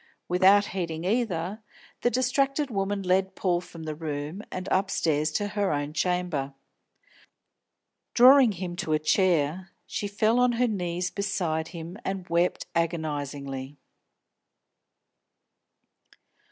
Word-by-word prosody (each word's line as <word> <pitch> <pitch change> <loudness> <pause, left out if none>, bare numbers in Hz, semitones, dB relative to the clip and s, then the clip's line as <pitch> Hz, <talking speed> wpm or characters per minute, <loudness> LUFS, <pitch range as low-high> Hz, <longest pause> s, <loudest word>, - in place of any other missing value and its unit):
Without 190 +3 +5
heeding 170 -3 -3
either, 200 -2 -1 0.4
the 240 - +3
distracted 270 +3 +1
woman 195 -1 -1
led 190 +1 +1
Paul 175 -2 0
from 165 -2 -11
the 155 -1 -4
room, 150 +3 -5
and 185 +1 -5
upstairs 160 -6 +1
to 205 +4 -1
her 205 -1 0
own 145 0 -2
chamber. 170 -6 -1 1.6
Drawing 255 -2 +7
him 175 -1 -5
to 155 - -1
a - - +4
chair, 175 +1 +1 0.2
she 205 - -3
fell 215 +4 +2
on 250 -1 +4
her 245 +1 +2
knees 180 -4 -2
beside 175 -5 -1
him 170 +2 -8
and 190 -1 -4
wept 170 +1 +1
agonisingly. 145 -4 -3
180 Hz, 115 wpm, -27 LUFS, 160-205 Hz, 1.6 s, Drawing